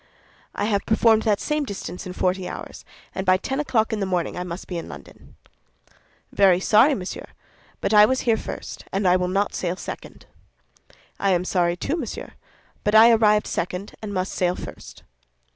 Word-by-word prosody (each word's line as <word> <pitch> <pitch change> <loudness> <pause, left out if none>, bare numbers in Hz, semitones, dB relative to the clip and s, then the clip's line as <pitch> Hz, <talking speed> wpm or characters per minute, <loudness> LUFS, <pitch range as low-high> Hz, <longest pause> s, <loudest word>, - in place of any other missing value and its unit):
"I - - -1
have 200 -2 -1
performed 220 0 +4
that 205 - +2
same 300 -1 -1
distance 185 - -6
in 180 - -6
forty 185 0 -1
hours, - - -8 0.3
and 190 - -3
by 185 -1 +4
ten 265 +8 -3
o'clock 225 -7 +1
in 215 - -1
the 195 - -1
morning 180 -2 -1
I 180 - -3
must 180 0 -7
be 175 -2 -4
in - - -9
London." - - -13 1.0
"Very 190 -3 +4
sorry, 225 +9 +4
monsieur; 185 -5 -6 0.5
but - - 0
I 210 0 +8
was 260 0 0
here 230 -2 +2
first, - - -7
and 195 +1 -1
will 180 0 +3
not 195 +3 0
sail 180 -1 -2
second." - - -9 0.9
"I 195 -1 +2
am 180 0 0
sorry, 175 -2 +1
too, 290 - -2
monsieur; 255 -10 -6 0.5
but 210 +1 +1
I 225 +2 +9
arrived 210 -2 +4
second, 180 +3 -4
and 215 -2 -5
must 185 -1 -2
sail 180 -1 0
first." - - -10
195 Hz, 180 wpm, -23 LUFS, 180-220 Hz, 1.0 s, I